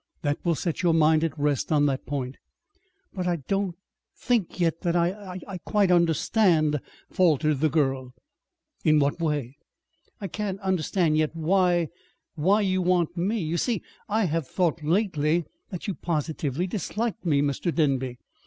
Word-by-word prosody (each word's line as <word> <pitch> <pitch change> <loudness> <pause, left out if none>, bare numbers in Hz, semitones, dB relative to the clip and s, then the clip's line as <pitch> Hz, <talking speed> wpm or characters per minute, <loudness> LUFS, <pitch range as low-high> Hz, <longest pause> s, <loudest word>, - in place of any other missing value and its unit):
That 145 -1 -1
will 170 -2 +2
set 165 +1 -2
your 170 -3 +3
mind 155 0 +4
at 160 -2 -2
rest 145 -1 0
on 145 -2 +4
that 135 -2 -1
point." 135 -2 -3 0.8
"But 180 -1 -3
I 175 - +2
I 160 -5 -5
don't 195 -3 0 0.4
think 230 -8 0
yet 165 -1 +1
that 170 -1 0
I 180 +2 -1
I 190 -3 -6
quite 200 +1 +1
understand," 165 -2 +3 0.3
faltered 155 -5 +2
the 155 +2 +3
girl. 135 -4 0 0.7
"In 155 -1 +4
what 145 +2 +1
way?" 145 -5 -2 0.6
"I 205 - -5
can't 195 +1 -4
understand 180 -3 +1
yet 155 +1 0
why 175 0 +2 0.4
why 190 +7 +2
you 185 -2 +1
want 175 -2 +1
me. 195 +5 0
You 160 +2 -1
see, 225 0 -1 0.3
I 215 +2 +2
I - - +2
have 165 -4 -1
thought 170 -1 0
lately 165 -1 +1
that 155 - -16 0.2
that 180 +1 -6
you 200 - -1
positively 155 -2 -2
disliked 220 +4 -3
me, 145 -5 +2
Mr. 145 +5 -1
Denby." 135 -6 0
165 Hz, 165 wpm, -26 LUFS, 150-185 Hz, 0.8 s, mind